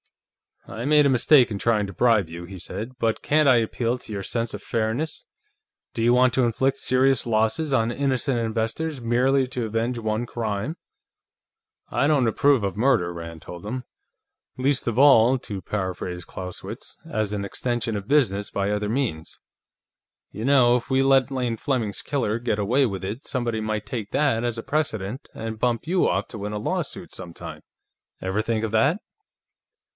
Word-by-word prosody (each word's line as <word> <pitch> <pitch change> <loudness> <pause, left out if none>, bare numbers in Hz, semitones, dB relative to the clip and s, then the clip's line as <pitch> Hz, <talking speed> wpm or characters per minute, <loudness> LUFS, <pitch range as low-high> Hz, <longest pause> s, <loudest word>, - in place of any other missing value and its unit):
"I 115 +3 -6
made 150 0 +5
a - - +4
mistake 130 +1 +5
in 100 - -3
trying 110 -2 +2
to 100 - -8
bribe 110 -4 +3
you," 85 +1 -8
he 95 +2 -9
said. 110 +7 -6
"But 115 -3 0
can't 150 0 +3
I 125 - +6
appeal 115 +1 0
to 115 - -12
your 100 -2 -4
sense 115 +2 -2
of 105 - -7
fairness? 115 +7 -2 0.7
Do 115 - -3
you 120 +1 +4
want 125 0 +4
to 130 - +3
inflict 130 +4 +1
serious 130 -1 +2
losses 115 +8 +1
on 115 -2 +2
innocent 130 -1 0
investors 115 +7 -2
merely 130 +3 +2
to 125 -3 -3
avenge 115 +3 -1
one 110 +1 -1
crime?" 115 - -3 1.1
"I 140 - +1
don't 140 -5 +3
approve 135 +1 +3
of 100 0 -2
murder," 115 -8 +2
Rand 85 -2 -8
told 85 +2 -9
him. 125 +4 -4 0.7
"Least 130 0 0
of 115 -1 -1
all, 130 -3 +6
to 100 -5 -6
paraphrase 90 -2 -4
Clausewitz, 90 +2 -8
as 110 -1 -1
an 100 -1 -2
extension 120 +2 -2
of 100 -1 -5
business 105 -9 +2
by 100 0 -1
other 105 0 -1
means. 110 - -2 0.9
You 110 - -5
know, 125 -3 +5
if 115 - -7
we 130 0 +3
let 135 -1 +4
Lane 125 -3 -1
Fleming's 115 -6 -2
killer 120 -6 -1
get 120 -3 -1
away 125 +7 +3
with 95 -3 -5
it, 105 +8 -5
somebody 120 -4 -1
might 110 -1 -2
take 110 -2 -5
that 135 -6 +2
as 120 -1 -1
a 115 - -5
precedent 125 -6 -2
and 110 -1 -5
bump 120 +2 0
you 180 +3 +2
off 95 +4 0
to 110 - -7
win 105 +1 -4
a 105 - -2
lawsuit, 180 - -3
sometime. 85 -3 -8 0.6
Ever 95 +3 -1
think 110 0 -1
of 110 - -2
that?" 140 - +3
115 Hz, 180 wpm, -24 LUFS, 105-130 Hz, 1.1 s, I